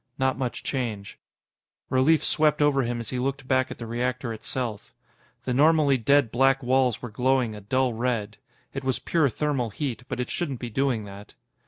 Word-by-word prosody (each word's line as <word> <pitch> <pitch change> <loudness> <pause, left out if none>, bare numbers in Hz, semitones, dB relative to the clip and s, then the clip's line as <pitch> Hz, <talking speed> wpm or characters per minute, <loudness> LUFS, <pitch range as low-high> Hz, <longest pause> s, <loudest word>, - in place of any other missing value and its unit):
Not 130 0 +1
much 125 -3 -4
change. 110 -7 -4 0.7
Relief 135 +5 +4
swept 150 -1 +2
over 145 -2 +3
him 120 -1 -2
as 115 - -6
he 125 - -2
looked 135 +1 -2
back 130 0 +2
at - - -7
the 115 - -7
reactor 120 +1 -2
itself. 110 -1 -5 0.5
The 125 - 0
normally 145 -1 +4
dead 140 0 +3
black 135 +2 +3
walls 125 -2 +2
were 120 - -5
glowing 125 0 +1
a 105 - -9
dull 130 +4 +1
red. 115 -3 -2 0.4
It 135 - -4
was 130 -1 0
pure 160 -5 +1
thermal 135 -2 -1
heat, 125 +3 -4
but - - -4
it 125 - -3
shouldn't 140 -8 -3
be 120 -1 -6
doing 130 -2 0
that. 100 +1 -11
130 Hz, 185 wpm, -26 LUFS, 115-135 Hz, 0.7 s, Relief